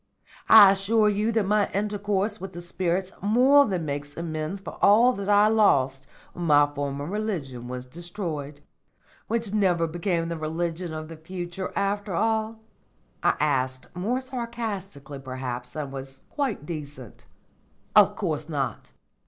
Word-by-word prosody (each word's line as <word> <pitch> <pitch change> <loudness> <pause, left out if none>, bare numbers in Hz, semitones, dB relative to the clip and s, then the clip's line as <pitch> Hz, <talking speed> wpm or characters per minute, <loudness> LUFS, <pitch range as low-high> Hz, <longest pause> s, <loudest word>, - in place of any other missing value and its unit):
I 210 -3 +10
assure 210 +2 +2
you 210 +2 0
that 220 -3 +2
my 210 +1 +2
intercourse 205 +1 -1
with 190 0 -7
the 175 - -7
spirits 180 +1 -1
more 260 +7 +5
than 180 -5 -2
makes 145 0 -5
amends 160 +2 -4
for 195 - -9
all 235 +5 +6
that 200 -2 -5
I 205 +1 +6
lost 135 -12 +2 0.3
when 175 - -5
my 145 -2 +6
former 145 -1 -4
religion 165 - -4
was 125 0 -6
destroyed." 155 -2 -6 0.7
"Which 225 -3 -2
never 180 -5 +2
became 170 +1 -1
the 165 -1 -4
religion 165 +2 -3
of 155 0 -6
the 165 0 -10
future 175 +2 -6
after 200 -1 -1
all?" 220 +2 0 0.6
I - - +3
asked, 130 -3 -1
more 225 +9 -1
sarcastically 220 - -5
perhaps 130 -2 -5
than 140 +1 -5
was 135 0 -8
quite 265 - -2
decent. 145 - -8 0.7
"Of - - +6
course - - -3
not. - - -3
175 Hz, 145 wpm, -26 LUFS, 145-210 Hz, 0.7 s, I